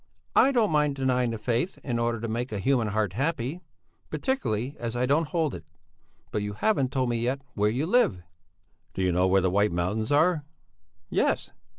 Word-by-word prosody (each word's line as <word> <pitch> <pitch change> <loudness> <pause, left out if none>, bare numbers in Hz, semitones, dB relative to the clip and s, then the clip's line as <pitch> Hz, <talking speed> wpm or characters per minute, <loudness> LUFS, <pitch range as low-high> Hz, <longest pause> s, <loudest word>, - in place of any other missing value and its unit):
"I 275 - +6
don't 230 -7 +2
mind 150 -2 +2
denying 125 -2 +1
the 115 - -3
faith 120 - -1
in 120 -4 -1
order 115 -1 0
to 115 - -2
make 120 +2 -3
a 105 - -2
human 120 +2 +1
heart 105 -3 -1
happy, 140 - -2 0.5
particularly 145 - -1
as 115 0 -3
I 125 +1 +1
don't 145 +4 +2
hold 160 -5 0
it. 85 - -7 0.7
But 105 - -1
you 105 0 -3
haven't 135 - +1
told 130 -3 0
me 120 -1 0
yet 130 +4 -1
where 105 0 +2
you 125 +7 -1
live." 170 - +2 0.7
"Do 95 - -1
you 90 - +2
know 90 +2 +2
where 95 +1 +4
the 90 0 +1
White 100 +2 +2
Mountains 100 +8 -1
are?" 155 +2 +3 0.7
"Yes! - - +1
120 Hz, 195 wpm, -27 LUFS, 105-145 Hz, 0.7 s, I